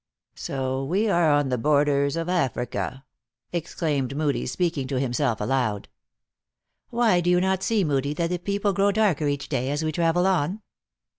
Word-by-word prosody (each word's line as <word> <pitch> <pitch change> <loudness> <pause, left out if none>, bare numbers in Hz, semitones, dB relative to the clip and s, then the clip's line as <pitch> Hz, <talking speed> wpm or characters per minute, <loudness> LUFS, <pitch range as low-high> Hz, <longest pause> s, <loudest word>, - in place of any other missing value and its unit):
"So 130 0 -3
we 190 +10 0
are 170 -3 +3
on 145 -2 +2
the 125 -2 -1
borders 140 +1 +2
of 165 0 -2
Africa!" 130 -5 -2 0.5
exclaimed 150 -5 -2
Moodie, 150 -2 0
speaking 150 -1 -1
to 130 -1 -1
himself 125 -2 0
aloud. 110 -2 -1 0.5
" - - -63 0.2
Why, 235 -7 +3
do 175 - 0
you 180 0 +4
not 190 0 +1
see 215 0 +1
Moodie, 140 -2 0
that 170 +2 -1
the 180 - -1
people 200 +2 -1
grow 200 +2 +3
darker, 195 -8 +1
each 145 0 -2
day, 130 -2 -1
as 145 +2 -1
we 155 - 0
travel 170 +3 +1
on 190 +2 0
150 Hz, 170 wpm, -25 LUFS, 135-180 Hz, 0.5 s, you